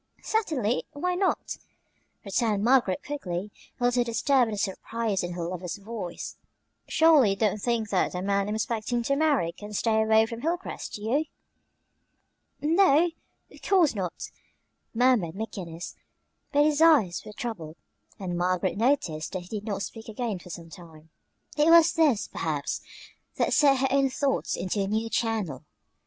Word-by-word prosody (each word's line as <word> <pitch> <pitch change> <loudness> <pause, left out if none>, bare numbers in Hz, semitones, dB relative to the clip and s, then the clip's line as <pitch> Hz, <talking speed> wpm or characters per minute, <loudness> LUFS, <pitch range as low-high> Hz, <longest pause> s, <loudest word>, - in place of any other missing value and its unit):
"Certainly; 290 - 0
why 360 +5 -1
not?" 370 +1 -1 0.7
returned 205 0 0
Margaret 235 -6 +3
quickly, 205 -9 -4 0.3
a - - -4
little 245 0 +3
disturbed 245 +2 +2
at 220 - -4
the - - -8
surprise 205 +1 -2
in 175 0 -4
her 170 -1 -4
lover's 180 0 -5
voice. 200 -4 -7 0.5
"Surely 315 -8 +5
you 195 - +1
don't 210 +1 0
think 230 -2 -1
that 185 - +1
the 180 0 -3
man 200 0 0
I'm 210 - -1
expecting 230 +2 -1
to 275 +4 +1
marry 285 - +2
can 210 +4 -10
stay 220 +1 +2
away 220 0 +4
from 230 +1 -7
Hilcrest; 345 +5 -3
do 210 - -7
you?" 275 +8 +1 1.4
"N 310 +3 +2
no, 345 -3 +5 0.4
of - - -16
course 360 -7 +3
not," 185 -5 -5 0.6
murmured 235 -8 +2
McGinnis; 185 -5 -6 0.6
but 290 0 +4
his 305 0 +1
eyes 275 - +5
were - - -9
troubled, 180 -10 -6 0.4
and 185 -4 -4
Margaret 180 +1 0
noticed 210 - 0
that 185 - -3
he - - -14
did 205 - -15
not 200 -3 -3
speak 225 -1 -8
again 220 -3 -3
for 180 - -13
some 165 -1 -9
time. 160 -3 -14 0.5
It 300 +2 +5
was 335 0 +7
this, 300 -10 +2
perhaps, 150 -3 -3 0.5
that - - +1
set 280 -2 +5
her 270 +1 +1
own 275 0 +3
thoughts 270 +1 -1
into 190 +2 -2
a 195 - -1
new 220 +2 -1
channel. 210 - -1
220 Hz, 165 wpm, -27 LUFS, 185-275 Hz, 1.4 s, was